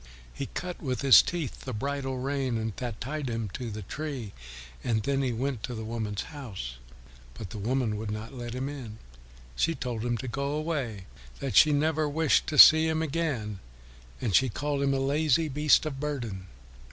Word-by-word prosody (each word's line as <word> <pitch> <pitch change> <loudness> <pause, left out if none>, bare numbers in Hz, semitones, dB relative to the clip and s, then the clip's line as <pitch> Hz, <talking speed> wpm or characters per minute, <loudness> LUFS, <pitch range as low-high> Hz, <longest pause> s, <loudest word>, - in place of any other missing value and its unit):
He - - -4
cut 180 -1 -6
with 130 -5 -2
his 135 -2 +9
teeth 170 -7 -4
the 130 - -5
bridle 135 +2 -2
rein 125 -5 -1
that 120 -3 -5
tied 140 +1 -3
him 115 -3 -3
to 120 +5 -5
the 105 -1 -6
tree, 135 -3 -5 0.5
and 110 -3 0
then 140 +3 +1
he 130 -2 0
went 125 0 -2
to 125 - -4
the 110 0 -5
woman's 110 -3 -3
house. 100 - -7 0.6
But 90 - -8
the 105 - -6
woman 115 0 0
would 110 0 -4
not 110 +4 -5
let 120 -2 -6
him 130 +1 -2
in. 130 -7 -7 0.6
She 165 - +1
told 120 -5 -4
him 120 -1 0
to 130 - -6
go 140 +4 -2
away, 145 - -3 0.3
that 135 - -3
she 155 - +7
never 155 +1 +1
wished 160 0 +2
to 150 - -2
see 160 +3 +10
him 160 0 0
again, 135 - -2 0.6
and 110 -5 -2
she 130 +6 +5
called 145 +4 -2
him 140 -1 +2
a - - 0
lazy 150 +3 +2
beast 150 +3 +4
of 140 -3 -4
burden. 120 -11 -4
130 Hz, 190 wpm, -28 LUFS, 110-145 Hz, 0.6 s, see